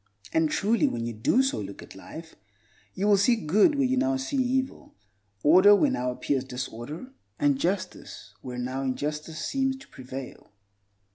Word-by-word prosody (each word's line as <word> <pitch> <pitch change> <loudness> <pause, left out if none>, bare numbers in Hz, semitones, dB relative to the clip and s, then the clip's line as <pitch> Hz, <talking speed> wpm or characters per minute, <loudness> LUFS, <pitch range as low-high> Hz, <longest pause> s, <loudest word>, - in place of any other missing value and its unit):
And 160 -1 +3
truly 215 +7 +2
when 115 -1 -3
you 120 - -3
do 115 - +2
so 265 - -1
look 100 -1 -7
at - - -13
life, 160 - -10 0.6
you 195 - -1
will 205 -1 +5
see 210 +5 +4
good 215 - +3
where 280 -1 +2
you 260 +1 +1
now 135 - +2
see 130 - -3
evil, 260 +1 -2 0.5
order 185 +7 +7
where 280 +6 +3
now 125 - -1
appears 130 +1 -1
disorder, 130 - -7 0.3
and 285 -2 +2
justice 185 - -3
where 125 -1 -7
now 130 +2 -3
injustice 150 +4 -3
seems 265 -1 0
to 265 - -15
prevail. 130 0 -9
160 Hz, 165 wpm, -27 LUFS, -, 0.6 s, order